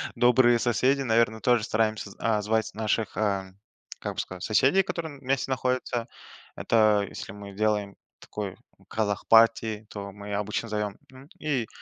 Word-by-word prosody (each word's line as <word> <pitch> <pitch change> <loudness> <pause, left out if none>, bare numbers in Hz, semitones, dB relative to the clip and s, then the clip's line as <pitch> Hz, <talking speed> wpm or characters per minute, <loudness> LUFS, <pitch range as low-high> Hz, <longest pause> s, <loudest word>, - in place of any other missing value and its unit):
добрые 120 0 +5
соседи, 130 +4 +2
наверно, 115 -3 +2
тоже 120 0 +3
стараемся, 110 0 -1
а, 110 -2 +1
звать 110 +1 0
наших, 110 -1 -1
ам, 95 -3 -1 0.4
как - - -4
бы - - -4
сказать, 95 0 -5
соседей, 135 - +4
которые 160 -6 -5
вместе 135 0 -1
находятся. 125 -2 -1 0.5
Это 105 -3 +3
если - - -8
мы 100 0 -10
делаем 105 -2 0 0.2
такой 100 -3 -6 0.3
казах-парти, 110 0 +3
то 100 -1 -7
мы 100 +1 -8
обычно 105 +3 -2
зовем, 105 -1 -2
ну 130 +1 -15
и 135 -7 -1
110 Hz, 140 wpm, -27 LUFS, 105-120 Hz, 0.5 s, добрые